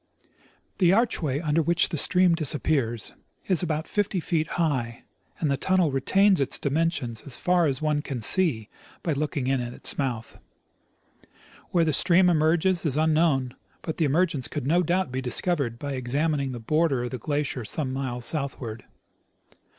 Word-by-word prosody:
The 175 -3 +5
archway 180 - +1
under 155 0 +1
which 170 +2 +2
the 160 - -3
stream 180 +2 +4
disappears 140 - 0 0.4
is 185 -4 +2
about 155 -3 -2
fifty 205 -2 -1
feet 160 -2 -1
high, 130 -9 -1 0.4
and 150 -4 0
the 140 - +1
tunnel 185 0 +1
retains 190 +7 +3
its 135 - 0
dimensions 145 -6 -1
as 135 - -3
far 180 -2 +2
as 135 +1 -2
one 150 -1 +1
can 130 -6 -5
see 135 - +3 0.4
by 165 - 0
looking 145 -2 -2
in 135 -1 +1
at 120 0 -5
its - - -10
mouth. 120 -5 -3 1.3
Where 170 -2 +2
the 155 - 0
stream 180 +4 +4
emerges 170 +3 +2
is 150 -4 0
unknown; 155 -5 +2 0.3
but 160 - -4
the 165 - +2
emergence 150 -3 +1
could 145 0 -5
no 170 +5 +3
doubt 180 -2 0
be 130 +1 -3
discovered 130 -1 -1
by 140 +2 -5
examining 140 +2 -1
the 120 - -6
border 145 +1 +1
of 125 - -4
the 130 - -5
glacier 145 -1 -2
some 130 +5 -3
miles 125 -3 -3
southward. 135 -6 -3
150 Hz, 165 wpm, -25 LUFS, 130-170 Hz, 1.3 s, The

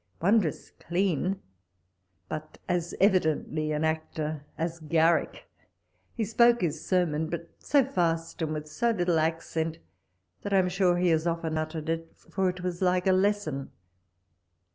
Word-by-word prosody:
Wondrous 190 -3 +1
clean, 185 +1 0 0.9
but 155 +5 -6
as 175 -2 -1
evidently 160 -5 +2
an 150 +1 -1
actor 155 -1 -2
as 165 +1 -2
Garrick. 165 +1 +1 0.7
He 225 - 0
spoke 235 +2 +4
his 160 -3 -1
sermon, 160 -4 +1
but 170 0 -5
so 280 -3 +3
fast, 165 -10 -1
and 160 -1 -1
with 155 0 -5
so 235 +10 0
little 175 -6 +2
accent, 160 0 -1 0.6
that 205 - -3
I - - +5
am 185 -1 +3
sure 180 -1 +2
he 180 0 +2
has 160 0 +2
often 165 -1 -1
uttered 155 0 -3
it, 165 0 -3
for 190 -1 -1
it 180 0 -5
was 180 -1 -3
like 180 0 +2
a 190 - +5
lesson. 185 -8 0
170 Hz, 145 wpm, -28 LUFS, 160-185 Hz, 0.9 s, I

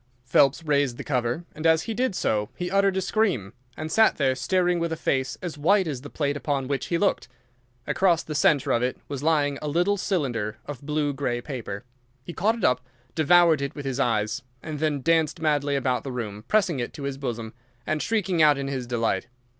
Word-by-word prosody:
Phelps 135 +5 +3
raised 140 -5 +1
the - - -6
cover, 125 +4 -1
and 155 +2 -1
as 160 0 +4
he 225 - -3
did 250 -3 0
so 105 - 0
he 180 0 -4
uttered 195 -1 +3
a - - +1
scream, 185 - 0 0.2
and 155 0 -5
sat 220 +5 +5
there 135 -3 +2
staring 175 +7 +1
with 170 0 -1
a - - 0
face 130 -5 -1
as 165 -4 -5
white 190 +6 +4
as 140 -6 -4
the 145 - -9
plate 145 -2 -1
upon 140 -2 -2
which 140 -2 -2
he 170 - +1
looked. 200 +3 +1 0.6
Across 175 -4 +2
the 155 - -6
centre 145 -1 +3
of 120 - +2
it 125 +1 -1
was 140 -2 -5
lying 145 -3 +1
a 150 - -4
little 175 +7 +1
cylinder 120 - -1
of 145 -4 -7
blue 150 0 -1
grey 130 -3 -2
paper. 120 -5 -6 0.4
He 175 - -7
caught 215 +7 +1
it - - -7
up, 125 0 +3 0.3
devoured 165 -1 +5
it 140 - -3
with 145 -2 -7
his 135 0 -2
eyes, 110 -4 0 0.2
and 155 -2 -5
then 150 -3 0
danced 165 0 +2
madly 145 -2 +1
about 130 -2 0
the 135 - -5
room, 110 -4 -5
pressing 195 -9 +2
it 120 - -3
to 145 - -8
his 140 -1 -4
bosom 115 -4 -4 0.3
and 155 -1 -1
shrieking 195 -7 0
out 150 -2 +6
in 135 0 -3
his 130 -3 -3
delight. 115 -3 -1
145 Hz, 215 wpm, -25 LUFS, 130-170 Hz, 0.6 s, out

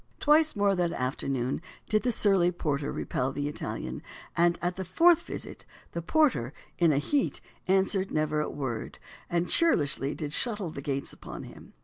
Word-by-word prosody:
Twice 310 0 +4
more 200 -1 +3
that 175 -2 +1
afternoon 130 +1 -2 0.3
did 215 0 +2
the 250 - +1
surly 195 -5 +3
porter 145 -4 -2
repel 130 +2 -2
the 145 +1 -2
Italian, 150 - -5 0.3
and 170 0 +3
at 175 +1 -1
the 190 - -4
fourth 330 - +5
visit - - -8 0.3
"the 170 - -3
porter, 170 - +2 0.3
in 170 -3 +5
a 140 - +2
heate, 275 - 0 0.3
answered 190 +1 +2
never 155 0 0
a - - -2
worde, 130 -6 -4 0.3
and 170 0 +1
churlishlie 145 - +2
did 150 -2 -4
shutte 205 -3 0
the 140 - -6
gates 140 0 -3
upon - - -9
him." - - -13
170 Hz, 165 wpm, -28 LUFS, 145-205 Hz, 0.3 s, fourth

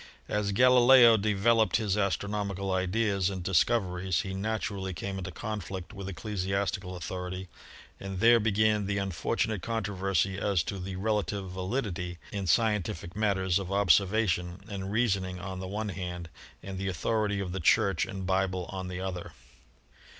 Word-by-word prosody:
As 105 -1 0
Galileo 125 +1 +7
de 105 0 +1
veloped 110 +2 +3
his 105 -4 +1
astronomical 100 -1 -1
ideas 95 +1 +1
and 95 -2 -5
discoveries 95 -2 +1
he 95 - -5
naturally 100 -2 -3
came 95 +3 -4
into 95 0 -5
conflict 100 -1 -6
with 100 -2 -6
ecclesiastical 95 -1 -2
authority 90 +1 -5 0.5
and 95 -1 -5
there 115 +2 +6
began 105 -1 +2
the 100 0 -1
unfortunate 100 +2 -1
controversy 95 -4 -1
as 100 -5 +1
to 100 +2 -5
the 95 +1 -5
relative 100 -1 -1
valid 95 +8 -2
ity 90 -2 -5
in 100 -2 -3
scientific 95 -3 +1
matters 95 -4 +1
of 95 -1 -5
observation 95 -1 +2
and 100 -2 -5
reasoning 100 -5 0
on 95 0 -6
the 95 - -5
one 105 +2 -3
hand 90 -2 -5 0.3
and 95 -1 -6
the 95 - -2
authority 100 +3 0
of 95 -2 -3
the 95 - -3
Church 95 +1 +3
and 95 -1 -5
Bible 95 -1 0
on 95 -1 -5
the 90 0 -5
other. 90 -3 -5
95 Hz, 150 wpm, -29 LUFS, 95-105 Hz, 0.5 s, Galileo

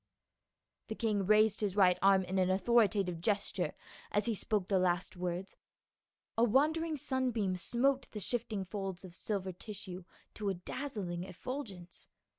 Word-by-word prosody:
The 220 - -4
king 210 -5 0
raised 215 0 +5
his 200 -3 0
right 180 -3 +5
arm 195 0 +5
in 190 +1 -1
an 185 0 +3
authoritative 195 -3 +3
gesture 200 +2 0 0.4
as 205 0 +1
he 230 - +1
spoke 205 -2 -1
the 195 -2 +3
last 180 0 +1
words; 180 +1 -3 0.8
a 230 - +3
wandering 305 +7 +3
sunbeam 245 -8 0
smote 255 +9 +1
the 210 - -6
shifting 215 -2 -2
folds 195 -1 -5
of 175 -2 -12
silver 195 -2 -2
tissue 190 -1 -7 0.3
to 210 -2 -2
a 195 - 0
dazzling 180 -3 -4
effulgence. 190 -2 -6
200 Hz, 145 wpm, -34 LUFS, 185-225 Hz, 0.8 s, raised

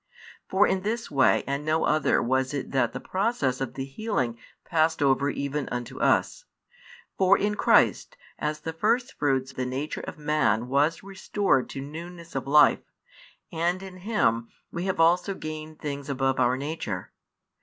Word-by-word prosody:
For 195 +2 +4
in 190 - 0
this 225 +3 -3
way 135 -3 +3
and 140 +1 -2
no 155 +1 +1
other 155 -3 +2
was 130 +3 0
it 140 - -4
that 125 -4 +1
the - - -5
process 185 - -1
of 130 -2 -4
the 135 - -3
healing 135 - -2 0.3
passed 160 -1 +1
over 140 0 +2
|151 - - -9
even 140 0 -3
unto 120 -1 -5
us. - - +1 0.7
For 190 -1 +5
in 210 +1 0
Christ - - +3 0.2
as 150 0 -2
the 160 +1 -4
firstfruits 150 - 0
the 130 - -3
nature 135 +4 -4
of - - -8
man 150 -7 +1
was 145 +6 +1
restored 195 -7 0
to 135 - -6
newness 170 +4 -9
of 135 0 -3
life, 150 +1 +5 0.7
and 175 +3 -1
in 190 -1 -9
Him 180 - 0 0.2
we 170 +2 -4
have 190 -3 -1
also 175 +4 +3
gained 155 -1 -7
things 140 -1 -5
above 135 -1 0
our 125 0 +3
nature. 135 - -4
150 Hz, 165 wpm, -26 LUFS, 135-180 Hz, 0.7 s, For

